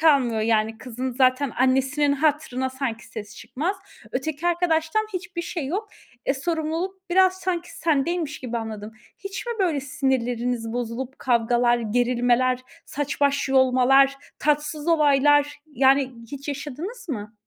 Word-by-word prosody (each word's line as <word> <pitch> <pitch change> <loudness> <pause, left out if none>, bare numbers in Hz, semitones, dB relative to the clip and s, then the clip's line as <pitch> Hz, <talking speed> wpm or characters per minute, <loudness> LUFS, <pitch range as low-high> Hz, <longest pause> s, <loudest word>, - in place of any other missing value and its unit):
kalmıyor 265 -8 +4
yani 220 0 +1
kızın 255 +2 -4
zaten 255 +1 +2
annesinin 270 +3 +2
hatırına 280 -3 0
sanki 255 -3 -4
sesi 215 -2 -8
çıkmaz. 285 - -3 0.4
Öteki 300 +5 -2
arkadaştan 345 +3 +1
hiçbir 355 -1 -4
şey 335 -4 -4
yok. 400 +9 -3 0.4
E, 270 - +2
sorumluluk 335 +5 -3
biraz 375 +1 +5
sanki 355 -2 -2
sendeymiş 315 0 0
gibi 240 -2 -4
anladım. 220 -1 -6 0.3
Hiç 400 +3 -6
mi 475 - -1
böyle 335 -8 +1
sinirleriniz 245 -4 -1
bozulup 245 +2 -4
kavgalar, 240 0 +2
gerilmeler, 245 +2 +2 0.2
saç 290 0 -4
baş 280 -1 +2
yolmalar, 265 +1 +5 0.2
tatsız 300 +1 0
olaylar, 290 -2 +4
yani, 270 -2 +3 0.2
hiç 280 +1 -7
yaşadınız 300 - -6
mı? 215 -6 -4
275 Hz, 125 wpm, -24 LUFS, 245-315 Hz, 0.4 s, biraz